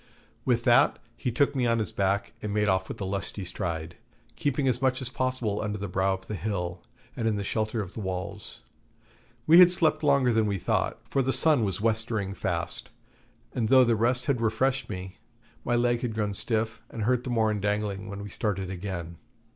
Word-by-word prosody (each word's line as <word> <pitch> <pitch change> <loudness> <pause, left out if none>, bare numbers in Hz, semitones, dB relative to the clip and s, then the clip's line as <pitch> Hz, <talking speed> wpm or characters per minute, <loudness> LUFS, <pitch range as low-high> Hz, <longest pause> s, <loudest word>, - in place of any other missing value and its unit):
With 120 -2 +2
that 125 +4 +5 0.2
he 125 - -2
took 140 +5 +1
me 125 -2 +1
on 115 0 +2
his 110 - -1
back 100 +1 0
and 105 - -3
made 105 0 +1
off 95 -1 +1
with - - -6
a - - -1
lusty 95 0 -3
stride, 85 -2 -4 0.4
keeping 145 -1 0
as 125 0 +1
much 130 -1 +2
as 130 -2 -2
possible 130 -5 -1
under 105 0 -2
the 100 0 -4
brow 95 +1 +1
of 95 0 -12
the 105 - -6
hill 90 -3 -3 0.3
and 115 -2 -1
in 110 - +1
the 100 - -2
shelter 110 +2 -1
of 95 - -10
the - - -6
walls. 95 0 -5 0.8
We 165 +3 +8
had 180 -1 +10
slept 175 -3 +2
longer 140 -5 +3
than 110 -1 +2
we 100 -1 0
thought, 85 - -1
for 135 - +1
the 130 0 +1
sun 150 -4 +4
was 95 -2 -2
westering 110 -3 0
fast, 85 -4 -3 0.6
and 110 -3 -1
though 130 -1 +7
the 120 -2 +3
rest 125 +3 +1
had 135 -5 0
refreshed 130 +4 0
me, 95 -2 -7 0.4
my 120 - +1
leg 120 0 +2
had 120 -3 -3
grown 105 -2 -1
stiff, 110 +1 -1
and 110 - -5
hurt 125 +2 +1
the 125 - -5
more 110 -3 +2
in 105 -1 -2
dangling 105 0 -2
when 100 0 -6
we 105 - -7
started 95 -3 -2
again. 85 -3 -5
110 Hz, 210 wpm, -27 LUFS, 100-125 Hz, 0.8 s, had